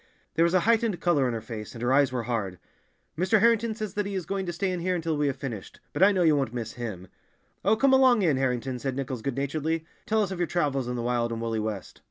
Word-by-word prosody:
There 160 - 0
was 170 +2 +2
a 185 - +4
heightened 225 -2 +2
color 150 -7 +2
in 120 - -1
her 115 - -4
face, 110 -1 -7
and 115 - -8
her 125 +2 +2
eyes 140 -1 +4
were 125 -2 -2
hard. 110 -6 -2 0.6
"Mr. 190 +6 +3
Harrington 230 0 +3
says 215 -3 -5
that 205 -1 -1
he 200 - -4
is 185 -3 -3
going 195 +2 -3
to - - -1
stay 185 +2 -1
in 180 - -2
here 180 +1 0
until 165 -2 -1
we 145 0 +1
have 135 - -1
finished, 120 -8 -7
but - - -3
I 195 +2 +7
know 185 -3 +2
you 160 -2 +5
won't 135 -4 -1
miss 115 -2 -4
him!" 105 -7 -6 0.6
"Oh, 205 +4 +4
come 270 +4 +3
along 255 -5 +5
in, 155 -7 +3
Harrington," 130 -1 -1
said 135 0 -3
Nichols 130 -3 -4
good 135 +1 -3
naturedly. 155 +3 -1 0.2
"Tell 220 0 +2
us 195 - -3
of 185 - -4
your 175 - +1
travels 140 -7 0
in 125 - -2
the 120 - -3
wild 120 -1 0
and 115 - -3
woolly 115 -1 -2
West." 105 -3 -5
145 Hz, 275 wpm, -27 LUFS, 120-185 Hz, 0.6 s, I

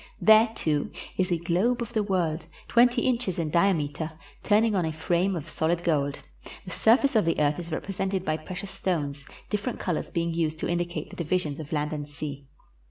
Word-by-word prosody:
There, 220 +1 +6
too, 150 -2 0 0.3
is 185 -1 0
a 175 - +3
globe 180 +9 +1
of 235 - -9
the 220 - +2
world, 180 -5 -1 0.2
twenty 240 +1 +4
inches 240 -8 0
in 160 -3 -1
diameter, 160 -3 +1 0.3
turning 215 +1 +3
on 185 -3 +2
a 160 - -1
frame 175 +4 0
of 165 -2 -5
solid 165 +2 0
gold; 145 -4 0 0.4
the 185 - -7
surface 250 +7 +4
of 220 - +5
the 165 0 0
earth 150 +1 +2
is 170 -1 -6
represented 190 +2 -2
by 155 -2 0
precious 185 +5 -7
stones, 145 -7 -2 0.3
different 210 -1 -2
colors 175 -4 -2
being 170 0 -1
used 160 -2 0
to - - -2
indicate 175 0 -2
the - - -9
divisions 160 -3 -1
of 150 -2 -8
land 150 -1 -1
and 145 -1 -5
sea. 145 -2 -6
170 Hz, 190 wpm, -27 LUFS, 155-195 Hz, 0.4 s, There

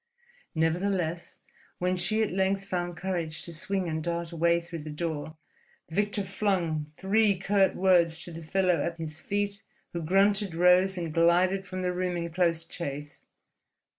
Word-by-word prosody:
Nevertheless, 170 +1 0 0.4
when 180 +1 0
she 195 +5 +1
at 215 - -1
length 195 +1 +1
found 175 -2 -3
courage 170 -4 -2
to 170 - -7
swing 190 +3 -2
and 160 -1 -2
dart 170 0 -2
away 170 +1 +2
through 170 0 -7
the 155 0 -7
door, 155 0 -4 0.5
Victor 205 +3 0
flung 180 -6 -1
three 200 0 +3
curt 195 +1 +2
words 175 -3 +4
to 175 - -8
the 165 0 -8
fellow 180 0 +1
at 170 0 -3
his 160 -1 -5
feet, 200 +1 -2 0.3
who 170 - -3
grunted, 195 +2 +2
rose, 180 +2 +4
and 165 -3 -3
glided 180 +4 +3
from 185 0 -4
the 180 0 0
room 180 0 -1
in 170 0 -3
close 165 -2 +1
chase. 145 -4 -6
175 Hz, 160 wpm, -28 LUFS, 165-190 Hz, 0.5 s, words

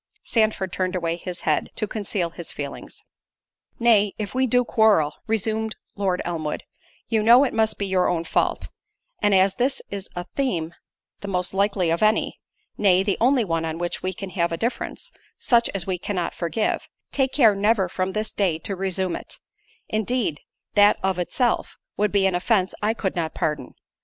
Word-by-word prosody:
Sandford 215 -5 +1
turned 185 0 -1
away 170 -2 -1
his 180 +1 -6
head - - 0
to 215 - -1
conceal 200 -4 -2
his 170 0 -6
feelings. 140 -1 -7 0.7
"Nay, 215 -4 +4
if 210 -2 -4
we 260 0 +2
do 245 +1 +3
quarrel," 215 -11 +3
resumed 220 0 -1 0.2
Lord 190 -3 0
Elmwood, 160 -3 -3 0.4
"You 220 -2 +1
know 235 +5 +7
it 275 - 0
must 220 -1 +1
be 200 - -2
your 190 -2 +2
own 170 -2 0
fault; - - 0 0.5
and 205 -2 +4
as 190 +1 +4
this 265 +2 +2
is 200 -1 -5
a 175 - -3
theme 175 - -2 0.5
the 200 - -7
most 180 -2 0
likely 195 -3 +1
of 165 - 0
any, 215 0 +2 0.4
nay, 190 -2 +4
the 200 -1 -1
only 250 -1 +4
one 165 -3 -1
on 160 0 -3
which 175 0 -3
we 185 - -1
can 190 +1 -7
have 170 -3 0
a 165 - -2
difference 250 - -3 0.3
(such 235 -1 +3
as 190 -3 -3
we 185 -2 -2
cannot 180 -3 -2
forgive) 175 +6 -1 0.2
take 270 -2 +1
care 230 -7 +5
never 200 -1 +2
from 185 +1 -2
this 215 0 -3
day 185 -6 +1
to 195 +5 -4
resume 190 -1 -1
it; - - -8 0.5
indeed 215 - -1 0.3
that 205 0 +6
of 190 -2 0
itself, 240 +7 0 0.2
would 210 0 +1
be 200 -1 +3
an 190 - +2
offence 185 +1 +1
I 215 +2 +1
could 190 -4 -2
not 165 -2 -2
pardon. 150 -1 -2
195 Hz, 180 wpm, -24 LUFS, 180-220 Hz, 0.7 s, know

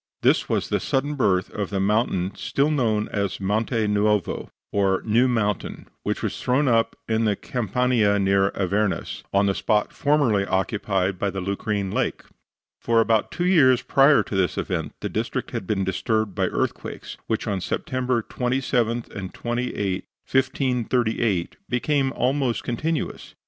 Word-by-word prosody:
This - - +3
was - - 0
the - - +1
sudden 145 +2 -1
birth 95 -10 +1
of 100 -2 -3
the 100 - -2
mountain 95 -2 +1
still 140 +8 0
known 110 -7 +1
as 100 -2 -2
Monte 110 +3 0
Nuovo, 105 -1 0 0.2
or 95 -2 +1
New 115 +4 +3
Mountain, 105 -5 -2
which - - -3
was - - -3
thrown 135 +3 +2
up 115 -2 +2
in 110 0 +1
the 105 -2 +2
Campania 120 -2 +1
near 95 0 +3
Avernus, 100 +1 -1
on 100 +1 +3
the 100 - +2
spot 105 +1 0
formerly 140 -9 +2
occupied 95 -1 -1
by 100 - 0
the 95 0 -4
Lucrine 100 +1 -2
Lake. - - -1 0.6
For 115 -1 +2
about 115 -1 +2
two 175 - -2
years 140 -9 +5
prior 140 +2 +5
to - - -6
this 95 -4 +1
event - - -2
the - - -2
district - - -3
had 95 - -4
been 100 -3 0
disturbed 110 +2 0
by - - 0
earthquakes, - - -4
which - - -1
on 100 -2 -2
September 125 +3 -1
27 120 -2 0
and 95 -2 -6
28, 120 -6 -2 0.2
1538, 120 -7 0
became 135 +2 +1
almost 130 -1 0
continuous. 155 +7 -3
110 Hz, 150 wpm, -24 LUFS, 100-125 Hz, 0.6 s, years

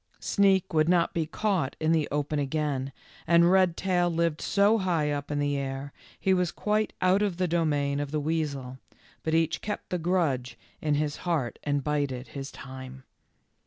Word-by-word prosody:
Sneak 195 -2 +2
would 155 +1 +3
not 175 -2 +3
be 165 -2 -1
caught 180 -6 -1
in 155 0 +1
the 160 -3 +2
open 145 +1 -1
again, 140 -2 -1 0.4
and 170 +1 +5
Redtail 180 -1 +3
lived 165 -2 0
so 205 +3 +3
high 165 -6 +1
up 145 -1 -3
in 145 - -1
the 145 0 0
air 135 0 -4
that - - -28 0.2
he 190 - +2
was 180 -2 +1
quite 215 +1 0
out 185 +2 +4
of 200 -5 0
the 180 0 +1
domain 145 -4 +1
of 145 -1 -3
the 150 +1 -1
weasel, 145 -4 -2 0.4
but 160 0 0
each 165 0 +1
kept 210 - -5
the 180 - 0
grudge 145 -9 0 0.2
in 150 -1 +1
his 145 0 -1
heart 155 - -2
and 145 -1 0
bided 140 -3 -2
his 140 0 -6
time. 130 0 -9
155 Hz, 180 wpm, -27 LUFS, 140-175 Hz, 0.4 s, and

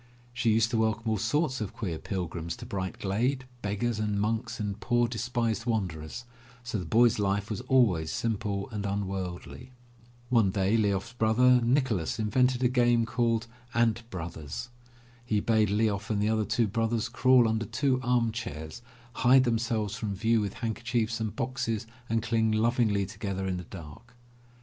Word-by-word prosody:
She 115 -1 +1
used 115 +1 +2
to 115 - +1
welcome 110 +1 0
all 110 - 0
sorts 130 - 0
of 105 - -4
queer 90 -8 -3
pil 95 -3 -3
grims 85 0 -5
to - - -9
Bright 95 -1 -4
Glade, 125 +7 -1 0.2
beggars 105 +2 -1
and 105 -1 -1
monks 115 +3 -1
and 105 -1 -3
poor 120 +1 +2
despised 120 0 -2
wanderers, 95 -3 -3 0.4
so 115 -3 -3
the 90 - -5
boy*s 115 +3 +4
life 100 +1 0
was 105 - -3
always 100 -12 +3
simple 105 -3 -2
and 105 -2 -3
unworldly. 95 +4 -4 0.6
One 115 -6 +4
day 95 +2 +1
Lyof 100 -3 +2
's - - -16
brother, 125 +2 +4
Nich 130 +4 +3
olas, 110 -7 -2
invented 125 +4 +2
a - - +6
game 120 -2 +3
called 115 -1 0 0.3
*'ant 115 0 +1
brothers.'' 85 +2 -6 0.5
He 110 -3 0
bade 110 -1 +2
Lyof 105 0 0
and 105 -2 0
the 105 +1 +1
other 110 -1 +1
two 115 +3 +1
brothers 115 +2 0
crawl 130 +1 +4
imder 110 0 0
two 130 +3 +1
armchairs, 115 - -2 0.3
hide 130 +1 +5
themselves 115 -3 0
from 105 -3 -3
view 115 +2 +2
with 100 -2 -3
handker 115 -2 -3
chiefs 115 -1 -1
and 110 -2 -3
boxes, 120 -4 -2 0.2
and 115 0 +1
cling 115 -1 +1
lovingly 110 -2 +2
together 100 -1 -4
in 95 -1 -1
the 90 - -7
dark. 100 +9 -11
110 Hz, 170 wpm, -28 LUFS, 100-120 Hz, 0.6 s, a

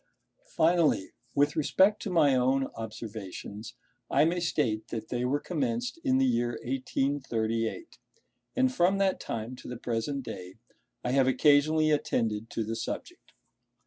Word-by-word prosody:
Finally, 160 - +3 0.2
with 145 +1 +3
respect 190 +7 +3
to - - -3
my 155 -6 +4
own 130 +1 +2
observations, 110 -1 -7 0.3
I - - +4
may 175 +2 +1
state 110 -10 0
that 110 -1 -5
they 125 0 -1
were 140 +3 +1
commenced 245 - -2
in 260 -3 +3
the 265 - +4
year 120 - +1
1838; 130 - -2 0.6
and 260 0 +2
from 190 -3 +3
that 195 -1 +1
time 115 +3 -5
to - - -11
the 125 - -5
present 125 +4 -2
day, 90 -5 -8 0.5
I 125 - -1
have 135 0 +3
occasionally 150 +4 +4
attended 115 -6 0
to 115 - -2
the 110 +1 -3
subject. - - -6
135 Hz, 145 wpm, -29 LUFS, 115-170 Hz, 0.6 s, my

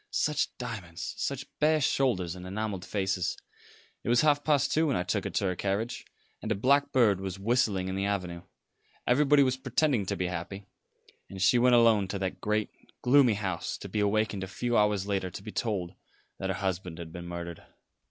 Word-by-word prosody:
Such 150 -1 0
diamonds; 100 -9 -6
such 135 -1 -2
bare 155 +1 +4
shoulders 120 - +1
and 90 0 -9
enamelled 100 -1 -3
faces. 95 -3 -1 0.7
It - - -3
was 120 0 +5
half 145 -1 +3
past 145 -2 +2
two 160 +1 +2
when 140 - +1
I 90 - 0
took 95 +2 -1
her - - -1
to 100 - -1
her 90 -1 0
carriage, 100 +6 -2 0.4
and - - -4
a - - +2
blackbird 125 -4 +3
was 95 -1 -4
whistling 100 -3 +1
in 95 - -3
the 100 +1 -1
avenue. 90 -4 -3 0.6
Everybody 145 +3 +5
was 130 -1 +1
pretending 130 -4 +1
to - - -1
be 90 - -1
happy; 90 +3 -5 0.6
and 95 - -8
she 100 +6 +4
went 125 0 +5
alone 115 -4 +5
to 100 - -3
that 95 -1 -4
great, 105 0 0 0.3
gloomy 125 -3 +5
house, 95 -4 -3
to - - -8
be 105 - -2
awakened 105 -1 +1
a - - -4
few 120 +6 -2
hours 105 -2 +3
later 95 -2 -1
to 95 - -9
be 110 - -7
told 100 -8 -2 0.5
that 95 - -2
her 95 - 0
husband 95 -3 -3
had 85 -2 -8
been 85 0 -7
murdered." 85 -1 -6
100 Hz, 195 wpm, -29 LUFS, 95-125 Hz, 0.7 s, was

